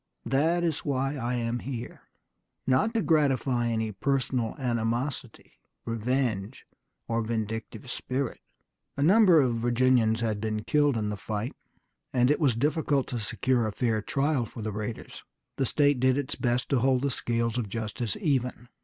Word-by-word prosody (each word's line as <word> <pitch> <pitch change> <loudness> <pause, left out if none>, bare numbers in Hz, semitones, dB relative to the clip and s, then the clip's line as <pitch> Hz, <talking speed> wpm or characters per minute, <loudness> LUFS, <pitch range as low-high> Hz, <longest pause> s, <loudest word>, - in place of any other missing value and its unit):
That 160 +8 +2
is 165 -4 0
why 135 0 -1
I 125 -2 -2
am 120 0 -1
here; 125 -1 -7 0.6
not 130 - +3
to 225 - +2
gratify 135 -6 +2
any 110 -1 -1
personal 125 +1 -1
animosity, 120 0 -3 0.3
revenge, 115 -1 -1 0.4
or 115 0 0
vindictive 110 +2 -4
spirit." 130 +1 -3 0.6
A 140 - +1
number 185 -1 +6
of 120 -3 +1
Virginians 120 -1 +2
had 110 -3 -1
been 110 -1 -2
killed 145 +2 +2
in 105 -1 -1
the 105 - -3
fight, 105 +4 -4 0.6
and 125 +1 +3
it 150 - +2
was 140 -8 +3
difficult 145 +1 +1
to 120 - -3
secure 120 +2 0
a - - -2
fair 110 -1 0
trial 135 +1 0
for 115 - -8
the 110 - -2
raiders. 105 +2 -6 0.4
The 135 - +1
state 145 -3 +3
did 130 +1 +3
its 140 -2 -2
best 120 0 -1
to 135 - +3
hold 130 +1 +2
the 140 - +1
scales 115 -1 -1
of 110 -4 -3
justice 110 +1 -3
even. 125 - -1
125 Hz, 160 wpm, -28 LUFS, 115-135 Hz, 0.6 s, number